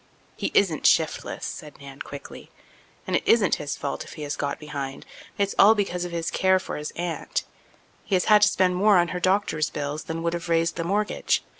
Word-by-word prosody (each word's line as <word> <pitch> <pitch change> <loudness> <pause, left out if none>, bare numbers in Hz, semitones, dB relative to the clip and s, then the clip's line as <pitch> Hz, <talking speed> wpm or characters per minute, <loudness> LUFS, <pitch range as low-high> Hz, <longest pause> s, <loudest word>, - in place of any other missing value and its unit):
"He - - -2
isn't 170 -7 +3
shiftless," 160 -1 +1
said 150 -2 -8
Nan 140 0 -11
quickly, 140 - -9 0.6
"and - - -1
it - - +2
isn't 220 -5 +4
his 145 -1 -4
fault 140 - -4
if - - -12
he 150 - -7
has 145 - -3
got 140 -1 -2
behind. 140 -3 -6 0.3
It's 200 -1 0
all 215 +3 +8
because 180 -4 -1
of 175 - -6
his 165 -1 -2
care 190 0 +3
for 185 - -5
his 150 0 -4
aunt. 175 - -3 0.6
He 195 - 0
has 180 - +1
had 210 -1 +6
to 210 - +7
spend 185 -3 +2
more 200 +1 +5
on 175 -1 +3
her 180 - -3
doctor's 185 -5 +1
bills 145 +1 -4
than 165 0 -4
would 170 0 0
have 170 0 -5
raised 165 0 +2
the 170 - -2
mortgage. 205 +5 0
170 Hz, 210 wpm, -25 LUFS, 150-190 Hz, 0.6 s, all